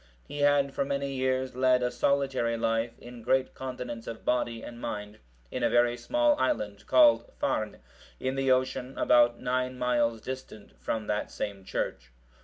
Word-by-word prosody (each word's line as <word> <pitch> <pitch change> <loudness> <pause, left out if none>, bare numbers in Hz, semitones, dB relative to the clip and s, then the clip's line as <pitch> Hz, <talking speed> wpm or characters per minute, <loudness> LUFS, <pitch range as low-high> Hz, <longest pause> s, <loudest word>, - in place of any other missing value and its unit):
He 145 - -6
had 145 -1 +3
for - - 0
many 140 0 -2
years 130 -1 -1
led 130 -1 +3
a 125 - 0
solitary 130 -2 +1
life, 115 +1 -1
in 120 -1 -11
great 130 +3 +1
continence 125 -3 -6
of 115 - -7
body 120 -2 0
and 120 0 -9
mind, 105 -1 -5 0.3
in - - -3
a - - +3
very 120 0 +3
small 300 - +2
island, 105 -5 -1
called 310 +10 +5
Farne,(741) - - -1 0.4
in 130 0 -1
the 135 0 0
ocean 130 0 0
about 120 -1 +4
nine 130 0 -1
miles 120 -2 +1
distant 120 -3 -8
from 110 -1 -2
that 105 0 -2
same 100 -2 -5
church. 65 -8 -4
125 Hz, 165 wpm, -29 LUFS, 115-130 Hz, 0.4 s, called